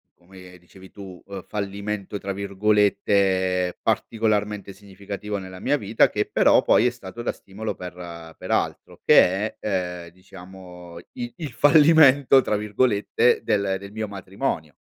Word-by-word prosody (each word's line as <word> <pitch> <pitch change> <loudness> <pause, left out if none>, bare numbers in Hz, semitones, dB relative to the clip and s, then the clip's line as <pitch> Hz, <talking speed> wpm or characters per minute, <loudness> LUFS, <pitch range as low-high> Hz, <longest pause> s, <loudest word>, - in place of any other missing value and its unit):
come 90 0 -15
dicevi 95 +2 -17
tu, 95 -3 -11
ehm, 100 -2 -8
"fallimento" 100 0 -5
tra 100 0 -5
virgolette 100 -2 +1
particolarmente 105 -3 -1
significativo 100 +1 -7
nella 95 -1 -9
mia - - +1
vita - - +2
che - - -2
però - - +4
poi 115 - +3
è 125 - +3
stato 120 -1 -10
da - - -2
stimolo 105 +3 -7
per 85 -2 -10
per - - -7
altro - - -2
che 95 +4 +3
è, 90 -4 -3
ehm, 85 - -15
diciamo 90 -1 -13 0.2
i 120 -1 -6
il 155 -6 -6
"fallimento" 145 0 +5
tra 105 - -1
virgolette 105 +2 +1
del 100 -2 0
del 100 +1 -11
mio 110 0 -4
matrimonio. 95 - -5
100 Hz, 140 wpm, -23 LUFS, 95-105 Hz, 0.2 s, fallimento